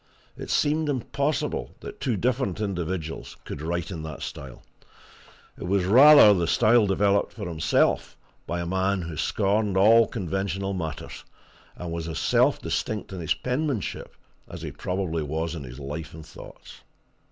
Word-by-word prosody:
It - - -8
seemed 150 +1 +1
impossible 140 - -2
that - - -9
two 120 -5 -1
different 120 -4 -1
individuals 90 -5 -4
could - - -6
write 85 +3 -3
in 85 -4 -5
that 80 -2 -7
style; - - -8 1.0
it - - -6
was 95 0 +1
rather 130 +1 +8
the 85 -3 0
style 110 +4 +4
developed 100 +1 +1
for 105 -4 -6
himself 80 -2 +1 0.3
by 85 0 -2
a - - -3
man 95 +1 0
who 85 -1 -6
scorned 100 +4 0
all 110 +3 +6
conventional 95 -1 -3
matters, 80 -4 -6 0.5
and 90 -1 -6
was 85 -1 -4
as 80 - -4
self - - +2
distinct 105 -2 -3
in 95 - -6
his 80 -3 0
penmanship 130 - -3 0.3
as - - -8
he - - -5
probably 90 -3 -3
was 80 +3 -3
in 80 -4 -6
his 60 +2 -10
life 75 +4 -6
and 80 -1 -10
thoughts. - - -13
95 Hz, 155 wpm, -25 LUFS, 80-105 Hz, 1.0 s, rather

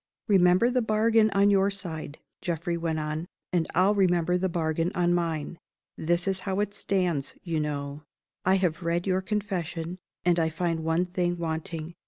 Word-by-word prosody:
"Remember 185 +3 +5
the 250 0 +2
bargain 220 0 +3
on 200 0 +4
your 195 0 +4
side," 160 -7 -6 0.2
Geoffrey 170 0 -2
went 165 -1 -1
on, 155 +2 -3 0.3
"and 170 -2 +2
I'll 185 +4 +4
remember 180 -3 +2
the 185 +1 +1
bargain 165 0 0
on 175 -1 +2
mine. 165 -2 -2 0.4
This 175 +3 0
is 190 -1 0
how 190 +1 -2
it 205 -1 -1
stands, 180 -8 -1
you 165 -3 -1
know. 145 -1 -3 0.4
I 190 +1 +4
have 180 -3 0
read 170 +1 0
your 190 -1 +1
Confession; 185 -4 -3 0.3
and 175 -1 +4
I 160 -1 +2
find 165 0 -1
one 165 +2 +1
thing 175 -1 -1
wanting. 160 0 -4
175 Hz, 170 wpm, -27 LUFS, 165-190 Hz, 0.4 s, Remember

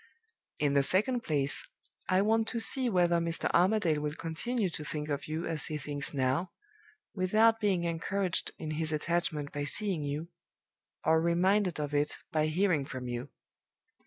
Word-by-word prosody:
In 145 -1 +1
the 140 - +5
second 215 - +2
place, 145 -7 0 0.5
I 185 +1 +4
want 225 +1 +2
to 235 - -2
see 245 +4 +2
whether 175 -4 +3
Mr. 170 0 -1
Armadale 180 -4 +3
will 150 0 -3
continue 190 +6 -2
to 150 - -6
think 150 0 -4
of 145 -1 -3
you 155 +2 -3
as 160 -2 -1
he 155 - -3
thinks 145 -1 0
now, 140 +6 0 0.6
without 215 +4 +3
being 195 -5 +1
encouraged 170 +2 -1
in 155 -1 -5
his 160 +1 -1
attachment 155 -2 -1
by 145 - -3
seeing 185 +3 -1
you, 145 +3 -4 0.8
or 160 0 +4
reminded 180 +2 +2
of 145 -1 -3
it 145 0 0
by 155 -1 +2
hearing 165 -2 +2
from 130 -2 -6
you. 120 0 -4
165 Hz, 160 wpm, -31 LUFS, 150-190 Hz, 0.8 s, the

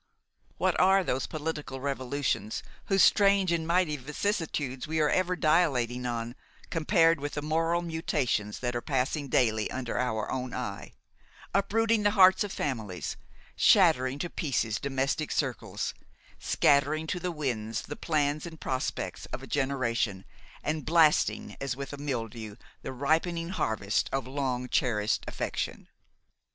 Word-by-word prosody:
What - - +1
are 190 +1 +5
those 130 -5 -1
political 150 -3 -4
revolutions, 135 -4 -2 0.2
whose 195 -1 +4
strange 200 -3 +5
and 165 -1 0
mighty 170 -3 +2
vicissitudes 145 -3 -2
we 160 +1 -1
are 150 -1 +3
ever 185 -1 +1
dilating 135 -8 +2
on, 120 0 -3 0.4
compared 165 -1 +3
with 145 +1 -4
the 150 - -3
moral 165 +3 +1
mutations 145 -10 -1
that 120 -1 -2
are 120 - -1
passing 140 +2 -1
daily 110 -5 +2
under 125 -2 -3
our 110 -4 -1
own 130 -1 -3
eye; 100 -6 -5 0.6
uprooting 220 +3 +2
the 205 - +4
hearts 190 +2 +7
of 205 - -5
families, 110 - -3 0.4
shattering 130 +1 +4
to 175 +4 -3
pieces 115 -8 -1
domestic 135 +2 -1
circles, 110 -7 -2 0.5
scattering 145 +2 +2
to 180 +3 -2
the 180 +1 -2
winds 115 -8 -3
the - - -6
plans 150 0 0
and 160 -2 -10
prospects 130 -1 -3
of - - -7
a - - -6
generation, 120 -8 -1 0.4
and 155 0 -1
blasting 160 -2 +3
as 135 -3 -2
with 140 +1 -6
a - - -5
mildew 115 -6 -4 0.3
the - - -5
ripening 165 +5 0
harvest 110 - 0
of 135 0 -1
long 130 -2 -2
cherished 110 -5 +1
affection! - - -4
140 Hz, 140 wpm, -29 LUFS, 125-165 Hz, 0.6 s, hearts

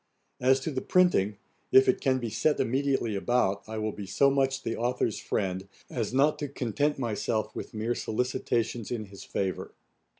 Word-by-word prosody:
As 130 +1 +4
to 160 - -3
the 130 -2 -2
printing, 110 - +3 0.3
if 395 +1 +7
it 385 - +2
can 130 -2 +2
be 120 -3 -4
set 150 +8 +1
immediately 135 -3 +1
about, 100 -1 +1
I 110 - -4
will 110 0 -1
be 100 -1 -8
so 135 +9 +3
much 135 -1 +1
the 115 - -2
authour's 120 -2 0
friend, 95 -1 -2 0.2
as 115 -4 -2
not 140 +4 +3
to 145 - -2
content 140 +3 -1
myself 110 -2 -2
with - - -7
mere 110 +3 0
solicitations 120 -1 -1
in 115 -3 -3
his 100 -1 -11
favour. 95 -1 -3
120 Hz, 175 wpm, -28 LUFS, 110-135 Hz, 0.3 s, if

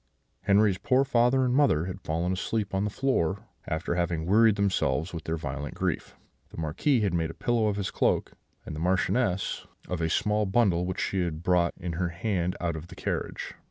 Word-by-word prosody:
"Henri's 100 -1 +3
poor 130 +1 +3
father 130 0 +3
and 125 - +1
mother 130 - +3
had 95 +1 -6
fallen 85 +2 -1
asleep 100 +2 -2
on 95 +1 +1
the - - 0
floor, 100 -5 0 0.2
after 80 +1 -2
having 85 -2 -1
wearied 110 +3 +5
themselves 95 -6 0
with 80 -2 -6
their 80 0 -1
violent 75 -2 -5
grief; - - -2 0.3
the - - -13
Marquis 95 - +1
had 100 -4 +1
made 80 -2 0
a 80 - -8
pillow 115 -2 +1
of 105 - 0
his 100 -2 -3
cloak, - - +1 0.3
and 75 - -6
the - - -5
Marchioness 95 +3 0 0.2
of 90 -2 -3
a 80 - +1
small 105 +4 +1
bundle 95 -4 +2
which 95 - -3
she 95 - 0
had 85 -2 -3
brought 90 -1 +2
in 90 -2 -4
her 85 +1 -1
hand 90 0 -1
out 85 -2 -1
of 80 +2 -7
the - - -12
carriage. - - -4
90 Hz, 200 wpm, -28 LUFS, 85-105 Hz, 0.3 s, wearied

